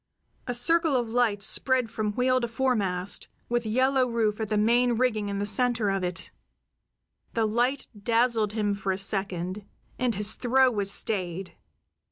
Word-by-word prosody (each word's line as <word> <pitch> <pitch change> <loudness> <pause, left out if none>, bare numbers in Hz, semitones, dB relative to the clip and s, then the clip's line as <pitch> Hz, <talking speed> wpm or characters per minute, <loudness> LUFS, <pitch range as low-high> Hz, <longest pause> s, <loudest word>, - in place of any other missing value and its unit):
A 245 - -2
circle 320 +5 +3
of 240 -3 0
light 225 -4 +1
spread 255 0 +1
from 210 -1 -2
wheel 255 +2 +1
to 235 - -1
foremast, 210 -7 0 0.2
with 240 -1 -1
Yellow 260 +3 +2
Rufe 225 -2 -1
at 215 - -3
the 215 - 0
main 240 +3 +3
rigging 220 -4 0
in 200 - -3
the 200 - -1
center 225 0 +2
of 195 -1 -2
it. 180 0 -4 1.0
The 225 -1 +2
light 245 +5 0
dazzled 225 0 +1
him 210 -2 0
for 195 -1 -2
a 185 - -2
second, 190 -1 -2 0.4
and 245 -3 0
his 210 +2 +1
throw 260 +1 +3
was 200 -3 -1
stayed. 190 -3 -2
220 Hz, 165 wpm, -26 LUFS, 200-245 Hz, 1.0 s, circle